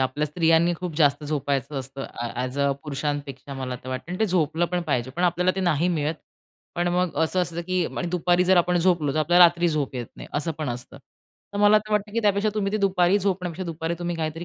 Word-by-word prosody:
आपल्या 130 +3 0
स्त्रियांनी 165 +2 +3
खूप 180 -4 -5
जास्त 150 -2 +3
झोपायचं 140 -1 -2
असतं. 135 +1 -7 0.3
ॲज 125 +2 -3
अ, 140 0 +3
पुरुषांपेक्षा 145 -2 -4
मला 130 -2 -4
तर - - -7
वाटतं 130 +6 -5
आणि 180 - -4
ते 220 - +3
झोपलं 175 -2 +1
पण 180 -1 0
पाहिजे 130 -6 -1
पण 175 - -1
आपल्याला 180 +1 +2
ते - - 0
नाही 175 -2 +2
मिळत 155 -2 0 0.6
पण 175 0 0
मग 180 0 0
असं 170 +3 +1
असतं, 170 0 -4
की 185 0 0
आणि 175 - -2
दुपारी 175 +1 +2
जर 185 +1 +4
आपण 175 0 +3
झोपलो 170 -5 +2
तर - - 0
आपल्याला 175 +3 +6
रात्री 175 0 +3
झोप 150 -4 -2
येत 120 -2 -4
नाही - - -10
असं 160 +3 -1
पण 155 -3 -2
असतं. 120 0 -6 0.6
तर 200 - -2
मला 210 +1 +6
तर 215 0 -8
वाटतं, 210 0 0
की 230 - 0
त्यापेक्षा 205 +1 +2
तुम्ही 205 -1 -1
ते - - +2
दुपारी 190 -1 +3
झोपण्यापेक्षा 185 -2 -2
दुपारी 165 0 -3
तुम्ही 175 -1 -3
काहीतरी 160 +1 -3
170 Hz, 225 wpm, -24 LUFS, 145-180 Hz, 0.6 s, आपल्याला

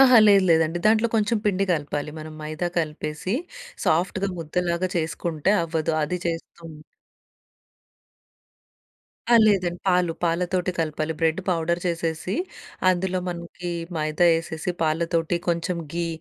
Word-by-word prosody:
అహా! 255 -2 +8
లేదు 200 -2 +6
లేదండి, 165 +1 +3
దాంట్లో 220 +2 +4
కొంచెం 220 +1 +2
పిండి 195 -2 +2
కలపాలి. 150 -2 -2
మనం 155 0 -8
మైదా 155 +3 -3
కలిపేసి, 155 +2 -3 0.5
సాఫ్ట్‌గా 185 +4 +1
ముద్దలాగా 170 +2 -1
చేసుకుంటే 165 +1 0
అవ్వదు. 165 -1 -1
అది 180 +4 -1
చేస్తూ 165 0 -4 2.7
ఆ! 240 - +6
లేదండి. 180 -4 +2
పాలు, 180 -2 +3
పాలతోటి 180 +2 0
కలపాలి. 155 0 -1
బ్రెడ్ 165 +2 +2
పౌడర్ 170 -1 +1
చేసేసి, 170 +1 -2 0.5
అందులో 185 0 +1
మనకి 175 0 -6 0.3
మైదా 155 +2 +2
ఏసేసి, 165 +1 -4
పాలతోటి 165 +1 +1
కొంచెం 170 +1 0 0.2
ఘీ 170 0 -1
170 Hz, 115 wpm, -24 LUFS, 160-180 Hz, 2.7 s, అహా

